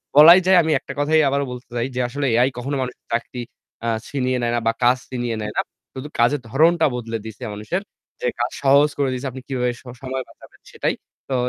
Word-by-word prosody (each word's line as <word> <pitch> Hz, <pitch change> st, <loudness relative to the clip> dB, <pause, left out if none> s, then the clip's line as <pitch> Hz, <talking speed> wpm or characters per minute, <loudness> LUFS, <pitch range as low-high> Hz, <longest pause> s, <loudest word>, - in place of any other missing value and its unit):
বলাই 165 Hz, +5 st, +10 dB
যায়, 185 Hz, 0 st, +6 dB
আমি 160 Hz, -, 0 dB
একটা -, -, -8 dB
কথাই 155 Hz, +2 st, +4 dB
আবারও 140 Hz, +1 st, 0 dB
বলতে 125 Hz, 0 st, -9 dB
চাই 120 Hz, +2 st, 0 dB
যে -, -, -1 dB
আসলে 140 Hz, +3 st, -2 dB
AI 125 Hz, +3 st, +4 dB
কখনো 135 Hz, +4 st, -3 dB
মানুষের 125 Hz, -1 st, -6 dB
চাকরি 120 Hz, +1 st, -2 dB, 0.4 s
আ -, -, 0 dB, 0.2 s
ছিনিয়ে 130 Hz, -2 st, -1 dB
নেয় 120 Hz, 0 st, 0 dB
না 120 Hz, -, +2 dB
বা 115 Hz, -, +5 dB
কাজ 125 Hz, +1 st, +5 dB
ছিনিয়ে 120 Hz, -2 st, -2 dB
নেয় 105 Hz, 0 st, -4 dB
না। -, -, +4 dB, 0.3 s
শুধু 130 Hz, +2 st, -6 dB
কাজের 125 Hz, +4 st, +3 dB
ধরনটা 160 Hz, +6 st, +4 dB
বদলে 115 Hz, -2 st, -3 dB
দিয়েছে 110 Hz, +3 st, -9 dB
মানুষের। 110 Hz, -, -3 dB, 0.4 s
যে 485 Hz, -, 0 dB
কাজ -, -, 0 dB
সহজ 140 Hz, +2 st, +5 dB
করে 140 Hz, -2 st, +1 dB
দিয়েছে 130 Hz, +2 st, -3 dB
আপনি 130 Hz, -, -8 dB
কিভাবে 125 Hz, -2 st, 0 dB
স -, -, -26 dB, 0.2 s
সময় 130 Hz, 0 st, -3 dB
বাঁচাবেন -, -, -18 dB
সেটাই। -, -, -1 dB, 0.3 s
তো 135 Hz, -, 0 dB
130 Hz, 215 wpm, -22 LUFS, 120-145 Hz, 0.4 s, বলাই